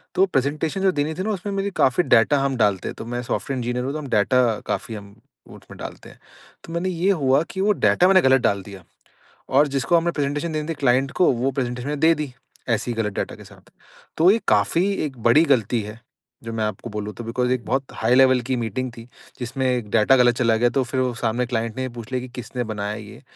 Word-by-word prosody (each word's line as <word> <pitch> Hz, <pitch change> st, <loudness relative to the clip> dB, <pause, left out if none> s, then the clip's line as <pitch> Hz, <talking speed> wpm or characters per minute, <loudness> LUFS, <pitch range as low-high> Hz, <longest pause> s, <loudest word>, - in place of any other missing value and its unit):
तो 190 Hz, -, +5 dB
प्रेज़ेंटेशन 155 Hz, +3 st, -1 dB
जो 190 Hz, -1 st, +3 dB
देनी 150 Hz, 0 st, -1 dB
थी 185 Hz, -, -3 dB
ना 215 Hz, -, -1 dB
उसमें 200 Hz, +1 st, -4 dB
मेरी 195 Hz, 0 st, -1 dB
काफ़ी 135 Hz, +7 st, +3 dB
डेटा 125 Hz, +3 st, +4 dB
हम 135 Hz, -1 st, 0 dB
डालते 100 Hz, -4 st, +1 dB
हैं, -, -, -5 dB
तो -, -, -8 dB
मैं 120 Hz, +1 st, -4 dB
सॉफ्टवेयर 135 Hz, +3 st, -3 dB
इंजीनियर 125 Hz, +1 st, -2 dB
हूँ 140 Hz, -, -3 dB
तो 155 Hz, -, -3 dB
हम 145 Hz, -, -7 dB
डेटा 115 Hz, +1 st, +2 dB
काफ़ी 110 Hz, -, -3 dB
हम 100 Hz, -1 st, -11 dB, 0.3 s
वो -, -, -12 dB
उसमें -, -, -14 dB
डालते -, -, -9 dB
हैं। -, -, -18 dB, 0.4 s
तो 165 Hz, -, -9 dB
मैंने 175 Hz, +2 st, -1 dB
ये 180 Hz, +2 st, +1 dB
हुआ 135 Hz, +2 st, +3 dB
कि 190 Hz, -, -3 dB
वो 210 Hz, +2 st, +3 dB
डेटा 180 Hz, -, +3 dB
मैंने 190 Hz, 0 st, +6 dB
गलत 130 Hz, -3 st, +4 dB
डाल 100 Hz, -1 st, +1 dB
दिया 100 Hz, -2 st, -11 dB, 0.7 s
और 145 Hz, +3 st, +4 dB
जिसको 135 Hz, +6 st, +2 dB
हमें 170 Hz, +1 st, +1 dB
प्रेज़ेंटेशन 145 Hz, +3 st, -2 dB
देनी 155 Hz, +1 st, -3 dB
थी 165 Hz, -, 0 dB
क्लाइंट 130 Hz, +1 st, +3 dB
को 180 Hz, -, +6 dB
वो 125 Hz, +2 st, -1 dB
प्रेज़ेंटेशन 125 Hz, -1 st, -3 dB
मैं 150 Hz, -1 st, -3 dB
दे 165 Hz, +1 st, +5 dB
दी, 150 Hz, -4 st, -5 dB, 0.4 s
ऐसी 120 Hz, -, 0 dB
ही -, -, -4 dB
गलत 105 Hz, -2 st, -3 dB
डेटा -, -, -4 dB
के -, -, -13 dB
साथ। -, -, -18 dB, 0.5 s
तो 165 Hz, +3 st, +5 dB
ये 225 Hz, -, +2 dB
काफ़ी 165 Hz, -, +2 dB
एक 135 Hz, -4 st, -7 dB
बड़ी 135 Hz, +7 st, +5 dB
गलती 120 Hz, -4 st, +2 dB
है, 105 Hz, +2 st, -9 dB, 0.4 s
जो 115 Hz, 0 st, -6 dB
मैं 110 Hz, -1 st, -1 dB
आपको 105 Hz, +2 st, -4 dB
बोलूँ 105 Hz, -1 st, -5 dB
तो 120 Hz, -, -7 dB
बिकॉज़ 125 Hz, +2 st, -1 dB
एक 130 Hz, -2 st, -1 dB
बहुत 135 Hz, +1 st, -1 dB
हाई 115 Hz, +3 st, +2 dB
लेवल 130 Hz, -1 st, +5 dB
की 130 Hz, -, +2 dB
मीटिंग 125 Hz, +2 st, -3 dB
थी 115 Hz, -, -9 dB, 0.4 s
जिसमें 130 Hz, +2 st, -3 dB
एक 120 Hz, -4 st, -2 dB
डेटा 115 Hz, +4 st, +4 dB
ग़लत 120 Hz, -1 st, +4 dB
चला 115 Hz, -3 st, +3 dB
गया 120 Hz, +2 st, +3 dB
तो 130 Hz, +2 st, 0 dB
फ़िर 130 Hz, +1 st, -2 dB
वो 125 Hz, -1 st, 0 dB
सामने 120 Hz, +2 st, 0 dB
क्लाइंट 115 Hz, -2 st, -3 dB
ने -, -, -2 dB
ये 130 Hz, -, -3 dB
पूछ 120 Hz, 0 st, -10 dB
लिया 130 Hz, -1 st, -1 dB
कि 130 Hz, -, -7 dB
किसने 125 Hz, 0 st, -4 dB
बनाया 105 Hz, -1 st, -4 dB
ये? 105 Hz, -1 st, -11 dB
130 Hz, 245 wpm, -22 LUFS, 115-150 Hz, 0.7 s, मैंने